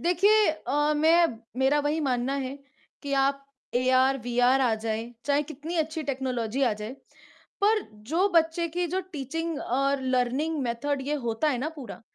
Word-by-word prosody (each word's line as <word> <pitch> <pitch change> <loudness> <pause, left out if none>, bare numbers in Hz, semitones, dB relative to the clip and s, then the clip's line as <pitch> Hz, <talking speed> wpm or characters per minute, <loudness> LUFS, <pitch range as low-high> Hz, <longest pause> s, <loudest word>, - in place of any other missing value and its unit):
देखिए 400 +5 +4
अ, 295 0 0
मैं 330 +3 +5 0.3
मेरा 270 +3 +3
वही 295 +2 0
मानना 260 -1 0
है, 275 0 -4 0.4
कि 280 -1 -4
आप 275 0 +2 0.3
एआर-वीआर 255 0 +3
आ 245 -4 +3
जाए, 225 +2 -4
चाहे 290 +1 +2
कितनी 310 +3 -7
अच्छी 315 0 -1
टेक्नोलॉजी 260 -3 -2
आ 240 - +3
जाए, 210 +3 -6 0.7
पर 430 +1 +4 0.3
जो 375 +4 +3
बच्चे 330 +1 +3
की 350 +2 -1
जो 370 +3 -1
टीचिंग 320 +3 -3
और 275 +2 0
लर्निंग 260 +5 0
मेथड 260 +4 -2
ये 295 - 0
होता 230 +7 +1
है 255 - 0
ना 290 +5 -2
पूरा, 250 -8 -8
275 Hz, 160 wpm, -27 LUFS, 255-315 Hz, 0.7 s, मैं